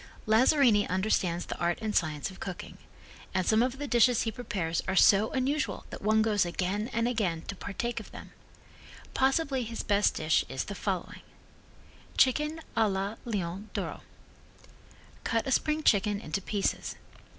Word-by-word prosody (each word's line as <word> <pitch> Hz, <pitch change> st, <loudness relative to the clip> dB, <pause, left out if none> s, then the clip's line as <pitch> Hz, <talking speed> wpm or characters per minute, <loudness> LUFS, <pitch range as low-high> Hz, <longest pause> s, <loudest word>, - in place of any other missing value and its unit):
Lazzarini 225 Hz, -1 st, +4 dB
understands 185 Hz, -2 st, 0 dB
the -, -, -6 dB
art 175 Hz, 0 st, +1 dB
and 215 Hz, -1 st, -3 dB
science 155 Hz, +1 st, 0 dB
of 190 Hz, -, -14 dB
cooking, 185 Hz, -2 st, -7 dB, 0.6 s
and 185 Hz, -1 st, +1 dB
some 220 Hz, +1 st, +4 dB
of 255 Hz, +2 st, 0 dB
the 290 Hz, -, -4 dB
dishes 240 Hz, -1 st, +4 dB
he 225 Hz, -, -1 dB
prepares 195 Hz, -8 st, -2 dB
are 190 Hz, -, 0 dB
so 200 Hz, +3 st, +6 dB
unusual 275 Hz, +3 st, -1 dB
that -, -, -7 dB
one 220 Hz, +1 st, +3 dB
goes 210 Hz, -2 st, +2 dB
again 185 Hz, +5 st, -2 dB
and 230 Hz, 0 st, 0 dB
again 190 Hz, -9 st, -1 dB
to 200 Hz, -, -6 dB
partake 220 Hz, +6 st, -4 dB
of -, -, -11 dB
them: -, -, -11 dB, 0.8 s
Possibly 270 Hz, 0 st, +1 dB
his 230 Hz, 0 st, -5 dB
best 205 Hz, 0 st, +2 dB
dish 155 Hz, 0 st, +2 dB
is 130 Hz, -, -2 dB
the 205 Hz, -, -6 dB
following: 195 Hz, -3 st, -4 dB, 1.0 s
Chicken 300 Hz, +5 st, +2 dB
a 225 Hz, -2 st, +3 dB
la 195 Hz, +3 st, -2 dB
Leon 200 Hz, -2 st, -3 dB
D'oro -, -, -4 dB, 1.2 s
Cut 230 Hz, -1 st, 0 dB
a 265 Hz, -, -2 dB
spring 305 Hz, +4 st, +1 dB
chicken 205 Hz, -3 st, +3 dB
into 195 Hz, +1 st, -3 dB
pieces. 200 Hz, +1 st, -2 dB
210 Hz, 160 wpm, -29 LUFS, 190-240 Hz, 1.2 s, so